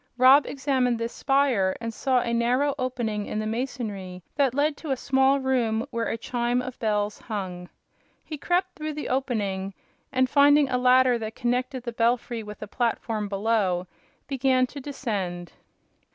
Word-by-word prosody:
Rob 260 +3 +7
examined 260 -3 0
this 230 +1 -4
spire 270 -9 +2
and 230 0 -4
saw 255 +1 +1
a 235 - -2
narrow 250 +5 +2
opening 235 -5 -2
in - - -4
the 215 - -2
masonry 215 -6 -4
that 275 -3 +2
led 290 +1 +2
to 315 - -8
a 265 - +1
small 265 +1 +3
room 240 -4 0
where 230 0 -1
a - - -2
chime 240 +1 -1
of 250 0 -6
bells 210 -2 -1
hung. 185 -5 -5 0.6
He 310 - -5
crept 360 +5 0
through 310 -4 -5
the 300 0 -5
opening 200 -7 -2 0.4
and, 260 0 +2
finding 285 +1 +5
a 250 -1 +1
ladder 250 -1 +4
that 220 0 -5
connected 250 +1 -1
the 240 - -4
belfry 235 0 0
with 210 -1 -9
a - - -7
platform 225 -2 -1
below, 195 -3 0 0.4
began 260 -2 +2
to 285 - -6
descend. 200 - -4
245 Hz, 165 wpm, -26 LUFS, 215-265 Hz, 0.6 s, Rob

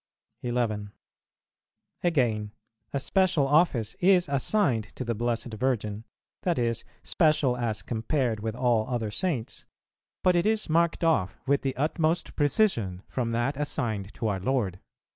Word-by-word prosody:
11. 115 -4 -1 1.1
Again, 115 -11 +1 0.4
a 140 - -1
special 180 -2 +2
office 135 - +2
is 180 -1 +4
assigned 140 - +1
to 130 - -4
the 115 - 0
Blessed 120 +1 -2
Virgin, 110 -3 -1 0.4
that 175 -3 0
is, 115 -1 0 0.2
special 150 -6 +2
as 115 -4 -2
compared 115 0 -1
with 110 +1 -3
all 120 -3 +1
other 115 -4 -2
Saints; 125 - -3 0.6
but 180 -1 +4
it 175 +4 +2
is 220 0 +1
marked 170 +1 +2
off 155 - +2
with 140 +1 +2
the 135 -1 -2
utmost 160 +3 0
precision 130 - +1
from 120 -3 -2
that 120 +4 0
assigned 110 -8 -2
to 115 - -2
our 100 -3 -1
Lord. 100 -4 -1
125 Hz, 140 wpm, -27 LUFS, 110-155 Hz, 1.1 s, is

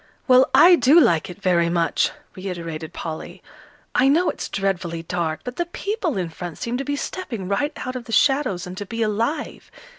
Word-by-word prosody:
"Well, 255 0 +6
I 350 0 +8
do 270 +7 +6
like 170 - +3
it 180 - -9
very 175 -3 +2
much," 170 -1 +1 0.3
reiterated 170 -4 -6
Polly. 160 -2 -7 0.5
"I 260 - +4
know 330 +6 +3
it's - - -7
dreadfully 180 -4 -2
dark, 165 -2 -2
but 250 0 -7
the 345 - -1
people 370 - -3
in 180 -3 -2
front 170 0 -7
seem 235 +1 -3
to 270 - -3
be 285 +1 -2
stepping 265 - -5
right 200 - 0
out 255 0 -5
of 250 -2 -6
the 230 - -9
shadows, 270 -8 +2
and 180 0 -7
to 205 - -5
be 230 +1 -2
alive. 230 +8 -2
205 Hz, 190 wpm, -22 LUFS, 175-275 Hz, 0.5 s, I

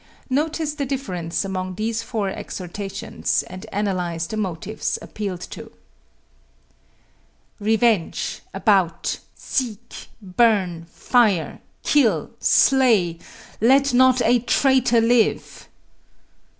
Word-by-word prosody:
Notice 305 +2 0
the 290 -2 -3
difference 185 -11 -3
among 185 -1 -4
these 220 +3 -2
four 225 -4 -2
exhortations, 190 +1 -4
and 185 0 -10
analyze 180 -5 -2
the 220 - -6
motives 200 0 -3
appealed 195 -4 -6
to: - - -9 1.9
Revenge! 220 -3 +1
About! 190 -6 +1 0.2
Seek! 235 -3 -4
Burn! 190 -4 +1
Fire! 215 -9 +1 0.2
Kill! 225 - +2
Slay! 220 -11 +3 0.4
Let 270 +3 +4
not 255 0 +5
a 245 +1 +4
traitor 250 -1 +3
live! 230 0 +1
215 Hz, 90 wpm, -22 LUFS, 185-245 Hz, 1.9 s, not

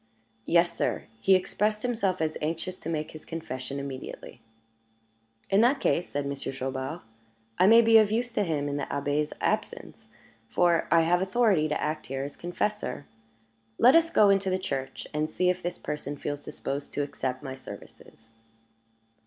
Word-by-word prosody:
"Yes, 170 0 +3
sir; - - -1 0.2
he 190 +11 +5
expressed 210 +3 0
himself 220 -8 0
as 155 0 0
anxious 165 +4 -3
to - - -6
make 155 -2 -3
his 155 - -11
confession 140 -5 -5
immediately." 140 -1 -8 1.1
"In 195 +2 +5
that 250 +5 +4
case," 175 - +1
said 145 0 -2
Monsieur 140 -1 -4
Chaubard, 135 +4 -4 0.6
"I 185 - +6
may 230 +2 +8
be 225 0 +7
of 215 -1 +3
use 240 +2 0
to 210 - 0
him 150 -5 -1
in 145 0 -2
the - - -2
Abbé's 145 +1 -1
absence, - - -3 0.4
for 175 -2 +2
I 165 - +5
have 175 +2 +2
authority 190 -5 +2
to 150 - -1
act 155 +1 -3
here 135 +1 -3
as 145 - -6
confessor. 175 -2 -3 0.7
Let 250 - +7
us 330 0 +5
go 210 -9 +5
into 195 -1 +2
the 185 - +1
church 135 -8 -4
and 155 +1 0
see 180 +3 +2
if 180 0 -5
this 175 0 -3
person 145 -1 -5
feels 145 +1 -4
disposed 145 -1 -5
to 145 - 0
accept 130 -2 -4
my 130 - -5
services." 115 -3 -12
165 Hz, 170 wpm, -28 LUFS, 145-195 Hz, 1.1 s, may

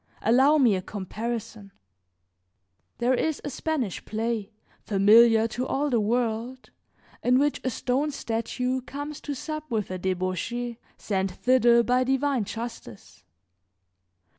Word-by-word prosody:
Allow 265 +7 +5
me 250 -7 +4
a 185 - -2
comparison. 215 +2 -5 1.3
There 245 +2 +2
is 310 +4 0
a 290 - -4
Spanish 270 - -2
play, 220 -1 -3 0.3
familiar 220 +3 +5
to 245 +4 -3
all 290 +1 -1
the 235 - +3
world, 235 +3 -2 0.5
in 250 +1 +3
which 290 +2 +1
a 260 - 0
stone 260 +4 -1
statue 250 0 -2
comes 290 +3 -7
to 290 - -4
sup 305 +2 -6
with 215 -6 -2
a 185 - -4
debauchee, 190 +7 -2 0.2
sent 190 -2 -1
thither 240 +1 +4
by 250 +2 +2
divine 270 -2 0
justice. 120 - -8
235 Hz, 125 wpm, -26 LUFS, 215-260 Hz, 1.3 s, Allow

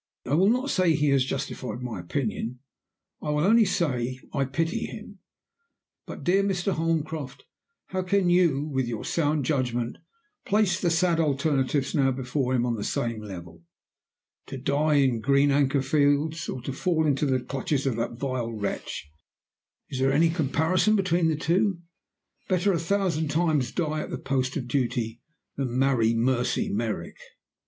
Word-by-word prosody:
I 130 - -2
will 185 +6 +5
not 255 +4 +1
say 180 -4 +3
he 145 0 +2
has 135 -2 +4
justified 130 -3 -4
my 115 -6 -4
opinion. 115 +5 -3 0.6
I - - -4
will 150 0 +1
only 220 +4 +5
say 130 -9 -1
I 140 -2 +1
pity 160 +5 -1
him. 210 -2 -10 0.9
But, - - -8
dear 190 +3 +3
Mr. 195 -1 0
Holmcroft, 160 -3 -2 0.4
how 185 - -1
can 185 0 +1
you, 175 -6 +3
with 135 -4 -1
your 115 -2 -4
sound 150 -3 0
judgment, 125 -4 -1 0.4
place 200 -3 +1
the 175 - +2
sad 165 0 +2
alternatives 140 -2 +1
now 135 -4 +3
before 130 0 -1
him 120 -1 +1
on 120 - 0
the 105 -3 -3
same 115 -2 -2
level? 85 -5 -9 0.9
To 135 - -6
die 145 +3 +1
in 130 -5 +3
Green 140 +3 +3
Anchor 140 -1 +2
Fields, 145 +3 +1
or 125 - -5
to 135 - -4
fall 160 +2 +1
into 145 0 +1
the 130 -1 +2
clutches 135 +2 -2
of 130 -4 +1
that 115 0 -2
vile 130 -3 -2
wretch 100 -7 -4 0.8
is 130 - -3
there 135 +1 +3
any 165 +4 +4
comparison 165 +7 +2
between 175 -4 +2
the 160 - +1
two? 175 +5 +1 0.7
Better 190 +1 +2
a 170 - 0
thousand 170 -2 0
times 150 -5 +1
die 155 -3 -1
at - - -6
the - - -3
post 130 0 -1
of 125 -4 -4
duty 120 -3 -1 0.4
than 130 -3 -2
marry 125 -4 +3
Mercy 125 +1 +1
Merrick. 110 0 -3
140 Hz, 165 wpm, -26 LUFS, 130-165 Hz, 0.9 s, will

